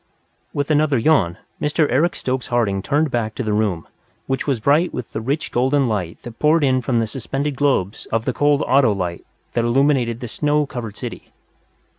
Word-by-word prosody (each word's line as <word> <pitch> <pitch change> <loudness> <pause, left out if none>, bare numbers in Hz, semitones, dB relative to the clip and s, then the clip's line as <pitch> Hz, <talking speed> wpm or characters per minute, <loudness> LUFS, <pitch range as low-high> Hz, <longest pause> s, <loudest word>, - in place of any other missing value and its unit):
With 145 +1 -2
another 150 -2 +3
yawn, 110 - +2 0.2
Mr. 150 +1 +2
Eric 155 +8 +2
Stokes 130 0 -2
Harding 110 -6 0
turned 145 +5 +1
back 110 -3 -1
to 130 - -3
the 110 -2 -1
room, 105 -6 0 0.4
which 135 +2 -2
was 135 -5 +1
bright 150 +9 +3
with 125 - -6
the 110 - -3
rich 140 +7 -2
golden 130 +2 +2
light 95 -7 -2
that 120 -1 -10
poured 155 +1 +3
in 130 -2 +3
from 120 -1 0
the 115 - +1
suspended 135 +5 -3
globes 130 -9 0
of 115 0 -1
the 130 - 0
cold 145 +2 +2
ato 130 -4 +4
light 90 -3 -4 0.3
that 120 - +1
illuminated 120 -1 +2
the 125 - -5
snow 150 +5 +1
covered 120 -6 -7
city. - - -7
130 Hz, 190 wpm, -20 LUFS, 110-145 Hz, 0.4 s, ato